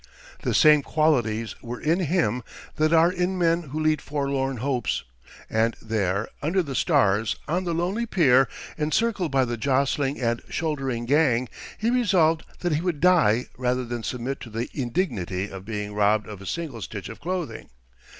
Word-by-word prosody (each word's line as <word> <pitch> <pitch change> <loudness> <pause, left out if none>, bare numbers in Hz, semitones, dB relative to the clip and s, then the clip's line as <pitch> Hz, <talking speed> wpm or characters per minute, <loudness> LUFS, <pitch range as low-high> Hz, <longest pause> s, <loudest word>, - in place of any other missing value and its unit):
The - - -1
same 150 -2 +6
qualities 120 -8 +1
were 120 0 -6
in 165 +4 +1
him 155 - +1 0.4
that 155 +1 +2
are 165 +1 +5
in 185 +1 -1
men 170 -1 +2
who 150 +4 -4
lead 155 -1 +2
forlorn 140 -2 -2
hopes; 125 - -1 0.4
and 115 +1 +1
there, 105 -2 -1
under 175 +6 +1
the 140 -4 -5
stars, 105 -3 +2
on 180 +4 -1
the 170 - -1
lonely 190 +8 -1
pier, 135 - +4 0.3
encircled 180 +3 0
by 135 -1 +3
the 120 -1 -3
jostling 135 +2 0
and 120 -1 0
shouldering 135 -7 -2
gang, 130 -3 +2 0.3
he 225 +2 0
resolved 185 -10 +3 0.2
that 175 -3 0
he 150 - 0
would 175 -4 -1
die 125 -10 +4
rather 125 0 0
than 120 0 -4
submit 125 +4 -3
to 120 - -9
the 115 +2 -4
indignity 110 - -2
of 95 -1 -8
being 105 -1 -4
robbed 105 0 +2
of 105 -2 -8
a 95 - -9
single 150 - -4
stitch 100 -3 -6
of - - -9
clothing. 180 0 -4
135 Hz, 170 wpm, -25 LUFS, 115-165 Hz, 0.4 s, same